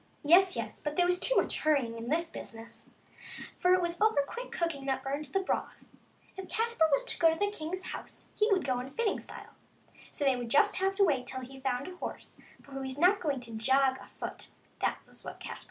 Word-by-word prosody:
Yes, 360 +5 +6
yes, 220 -2 -4
but 295 0 -3
there 355 - +4
was 360 0 +2
too - - +1
much - - +1
hurrying 275 -7 +2
in 230 +1 -6
this 330 +2 +1
business, 230 -4 -8 0.7
for 360 0 +5
it 365 - +1
was 345 +1 -3
over 430 -10 +4
quick - - -7
cooking 325 -6 -2
that 265 - 0
burned 280 +3 -2
the 385 +8 -1
broth. 380 - -3 0.5
If 380 -1 -8
Caspar 455 -7 +2
was 280 - +3
to - - -4
go 330 -1 +6
to 325 - -2
the 410 +2 +1
king's 370 0 -5
house - - -8
he 425 +1 +2
would 375 -3 +3
go 255 -2 +1
in 255 +2 -5
fitting 440 - 0
style, - - -10 0.6
so 290 - -2
they 270 -2 +4
would 240 -2 -4
just 410 - +4
have 385 +1 +1
to 400 - +4
wait 265 -7 +1
till 260 +1 -4
he 265 +1 -10
found 260 0 -1
a 365 -1 -9
horse, - - -7 0.2
for 280 - -17
he 270 - -4
was 265 0 -5
not 365 +6 +5
going 285 -6 -1
to 230 -2 -7
jog 265 +4 +3
it - - -14
afoot; - - -7 0.3
that - - +1
was - - -11
what - - -8
Caspar - - -7
said. - - -10
300 Hz, 235 wpm, -31 LUFS, 265-370 Hz, 0.7 s, Yes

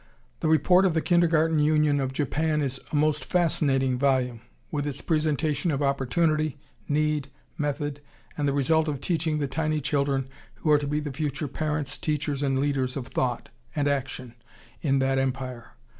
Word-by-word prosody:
The - - -1
report 180 +5 +5
of 175 -4 +2
the 160 - +2
Kindergarten 165 -3 +3
Union 150 -1 +3
of 135 -1 -1
Japan 150 +2 0
is 135 -1 -3
a - - -2
most 150 0 +2
fascinating 135 -7 +1
volume, 130 -4 +1 0.3
with 145 -1 -1
its 140 -1 -2
presentation 155 -1 0
of 145 -2 0
opportunity, 150 +3 +1 0.3
need, 150 -1 +1 0.3
method, 145 0 -2 0.3
and 145 - -1
the - - +2
result 155 +3 +2
of 145 -3 -2
teaching 160 -1 0
the 145 -2 -1
tiny 155 +2 -1
children 140 -2 0 0.3
who 155 - 0
are 150 - +6
to 145 - -3
be 150 +1 0
the 145 -2 -5
future 145 0 -2
parents, 150 0 -3
teachers, 150 -2 -1
and 135 -2 +1
leaders 135 -2 0
of 125 -2 -5
thought 125 -2 -1 0.3
and 145 -2 +1
action 135 -3 -2 0.5
in 135 -3 +2
that 135 0 +2
Empire. 130 -2 -3
145 Hz, 170 wpm, -26 LUFS, 135-155 Hz, 0.5 s, are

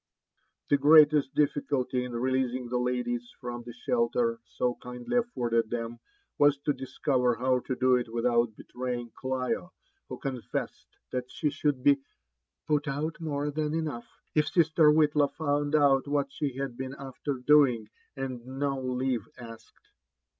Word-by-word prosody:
*' - - -44
The 145 - +5
greatest 150 -1 +6
difficulty 140 -3 0
in 125 -1 -6
releasing 130 0 -1
the 125 0 0
ladies 120 -1 -2
from 120 -1 -5
the 120 0 -9
shelter 235 -1 +1 0.2
so 125 -1 +1
kindly 125 - -3
afforded 120 - 0
them, 115 0 -4 0.4
was 145 -1 +5
to 145 - +1
discover 130 -2 0
how 125 +2 +1
to 130 - -4
do 130 0 +4
it 120 -2 -4
without 120 -1 +1
betraying 125 -1 -5
Clio, 130 +7 -3 0.4
who - - -5
confessed 130 -4 -4 0.2
that 125 0 -3
she 150 -3 -1
should 140 -2 -1
be 140 -1 +5 0.3
<* 60 - -58
put 150 0 +1
out 150 +4 -3
more 145 -2 -2
than 150 +1 -1
enough, 150 -7 -3 0.3
it 150 -1 +2
sister 160 -2 +4
Whitlaw 150 -1 +4
found 145 -1 0
out 140 -2 +4
what 140 -1 0
she 135 -3 -3
had 135 -3 -3
been 130 +1 -5
after 135 +1 -4
doing 125 -4 +4 0.3
and 130 -3 -4
no 135 +1 -2
leave 125 -3 -1
asked." 115 -2 -13
130 Hz, 155 wpm, -28 LUFS, 125-145 Hz, 0.4 s, greatest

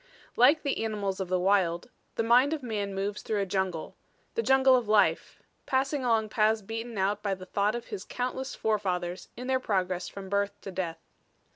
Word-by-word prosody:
Like 280 +6 +5
the 280 -6 -1
animals 205 -3 -2
of 190 - -2
the 185 +1 +1
wild, 185 +2 +1 0.2
the 230 - 0
mind 250 +6 +5
of 305 -4 -4
man 205 -4 -3
moves 200 +2 -2
through 215 -2 -1
a 200 - +1
jungle 190 -4 -2 0.4
the 460 - 0
jungle 265 - +5
of 245 -4 0
life, 210 -1 +2 0.2
passing 270 +1 0
along 225 -3 +2
paths 215 0 +2
beaten 225 +2 -5
out 200 +2 0
by 200 -2 -1
the 185 0 -10
thought 205 +3 0
of 240 0 -6
his 190 - -5
countless 255 +3 -4
forefathers 185 -5 -2
in 250 - -6
their 260 0 +1
progress 185 -6 -1
from 195 -1 -8
birth 200 +1 -1
to 195 - -7
death. 175 -3 -3
210 Hz, 190 wpm, -28 LUFS, 190-245 Hz, 0.4 s, Like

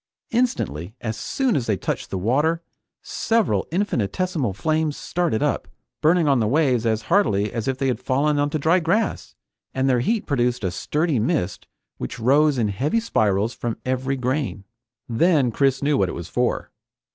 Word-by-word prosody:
Instantly, 110 - -1
as 110 -3 -3
soon 265 - -1
as 125 -5 -1
they 105 -3 +1
touched - - -3
the 95 - -3
water, 145 - +1 0.4
several 210 - 0
infinitesimal 170 - -1
flames 155 - -1
started 170 -11 -1
up, - - -1 0.3
burning 165 +1 +3
on 135 -3 +4
the 110 - +1
waves 130 -3 +2
as 110 0 0
hardily 105 - +2
as 115 -2 -3
if 130 -1 0
they 135 - -1
had 125 -4 0
fallen 140 +3 +1
onto 145 +2 0
dry 160 +5 +3
grass, 190 +6 -1 0.4
and 130 0 +1
their 125 -2 +3
heat 220 - 0
produced 125 -5 0
a 95 - 0
sturdy 150 - 0
mist 110 - -1 0.3
which 120 - -5
rose 140 +4 +3
in 110 -4 +1
heavy 135 - 0
spirals 110 - +1
from 120 -2 -4
every 130 +1 -1
grain. 125 - -2 0.4
Then 135 +1 +3
Chris 135 +2 +1
knew 145 0 +2
what 95 -2 +2
it - - -4
was 85 -1 -6
for. 125 0 -1
130 Hz, 170 wpm, -23 LUFS, 110-160 Hz, 0.4 s, on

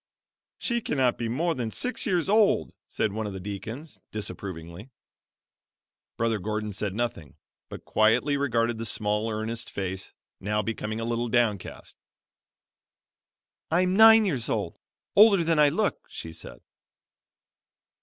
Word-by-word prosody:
"She 235 -1 -1
cannot 130 - 0
be 115 -1 -2
more 165 +8 0
than 125 -6 -3
six 250 - -2
years 180 -5 +1
old," 210 0 +3
said 105 - -1
one 110 0 -3
of 100 - -5
the 95 - -6
deacons, 110 - -7
disapp 105 -1 -4
rovingly. 90 +3 -8 1.3
Brother 115 -2 0
Gordon 105 +1 -3
said 100 0 -3
nothing, 105 - -3 0.3
but - - -9
quietly 120 +7 +3
regarded 120 -5 0
the 115 - -3
small, 105 +1 -1
earnest 110 +1 -3
face, 95 -1 -5 0.2
now 105 +2 -1
becoming 110 0 -3
a 115 - -3
little 120 +1 -1
downcast. 110 -6 -1 1.7
"I 170 +3 +3
am 185 0 +1
nine 220 +1 +8
years 135 - -1
old; - - -2 0.4
older 200 -3 +7
than 165 -1 +1
I 150 -1 +6
look," 205 +8 -1
she 80 - -7
said. - - -10
115 Hz, 140 wpm, -27 LUFS, 105-155 Hz, 1.7 s, nine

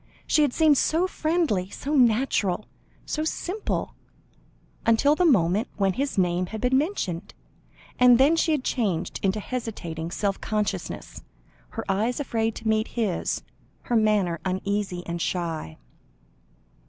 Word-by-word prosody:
She 305 - +3
had 290 -3 +3
seemed 305 -1 +4
so 330 +3 +2
friendly, 310 - 0
so 285 +8 -4
natural, 225 -7 +2 0.4
so 310 - -2
simple, 365 +6 -3 0.9
until 230 +6 +4
the 360 +4 +2
moment 205 - +3
when 195 -2 +1
his 275 +1 -2
name 180 -1 +1
had 220 +4 -6
been 250 +4 +2
mentioned, 210 - -1 0.6
and 250 -1 +7
then 280 +6 +5
she 330 0 +2
had 295 -4 0
changed 190 -10 -1
into 195 +2 +1
hesitating 195 -9 -5
self 195 +2 -2
consciousness, 210 -1 -3 0.6
her 225 - -3
eyes 215 +7 0
afraid 225 -5 -1
to 225 - -6
meet 220 0 +2
his, 210 -7 -1 0.4
her 240 - -1
manner 210 -6 +2
uneasy 190 -1 -2
and 170 0 -4
shy. 165 - -3
220 Hz, 135 wpm, -25 LUFS, 185-270 Hz, 0.9 s, and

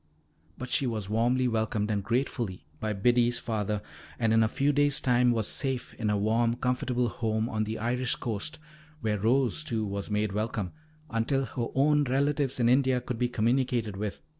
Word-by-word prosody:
But 125 - -7
she 135 - +2
was 105 -4 -3
welcomed 120 +4 +2
warmly 110 -1 0
and 100 -1 -1
gratefully 115 - -2
by 110 - -2
Biddy's 120 +4 +3
father, 105 -2 -2 0.3
and 115 -2 +2
in 115 - +5
a 110 - +4
few 140 +6 +1
days' 145 0 +3
time 125 -1 +3
was 115 -3 +1
safe 135 -3 0
in 110 -2 -2
a 105 - +2
warm, 115 +3 +2
comfortable 125 0 0
home 110 -1 -1
on 110 -2 -1
the 110 +1 -4
Irish 125 +2 0
coast, 115 +6 -4 0.4
where 105 -2 0
Rose, 130 +7 +2
too, 115 -6 -2
was 100 0 -4
made 105 0 0
welcome, 105 -2 -2 0.4
until 125 +4 0
her 120 0 -3
own 145 +2 +4
relatives 140 0 +1
in 120 - +3
India 130 0 +3
could 125 -1 -5
be 125 -1 +1
communicated 120 -2 0
with. 100 0 -4
115 Hz, 180 wpm, -28 LUFS, 110-125 Hz, 0.4 s, in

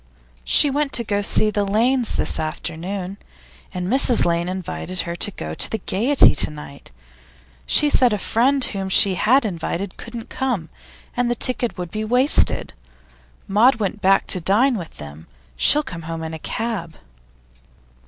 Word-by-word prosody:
'She 280 - +5
went 290 0 -1
to 210 -5 -1
see 215 +1 +2
the 205 0 -1
Lanes 230 +5 +1
this - - 0
afternoon, 180 +5 -5 0.5
and 180 -1 -5
Mrs 255 +1 +3
Lane 170 +1 -1
invited 185 -1 -5
her 170 0 -6
to 205 - +1
go 80 - -7
to - - -2
the 220 - -3
Gaiety 240 +8 +3
to - - +4
night; 150 -2 -11 0.8
she 300 - +4
said 255 -4 +3
a 210 - -1
friend 260 +7 0
whom 195 -2 -5
she 190 0 +4
had 245 +8 +2
invited 180 0 -5
couldn't 230 -1 -9
come, 240 -12 -3 0.5
and 245 0 0
the 240 - -1
ticket 245 -2 -1
would 175 -2 -6
be 215 0 -4
wasted. 250 +6 +2 0.7
Maud 225 +7 +3
went 210 -1 -4
back 195 +1 +2
to 185 - 0
dine 230 +9 +2
with 175 -6 -8
them. 75 +2 -11 0.3
She'll 300 - +5
come 170 -11 -8
home 165 0 -7
in 160 0 -6
a 160 - -7
cab. 200 -5 -5
200 Hz, 165 wpm, -20 LUFS, 175-240 Hz, 0.8 s, She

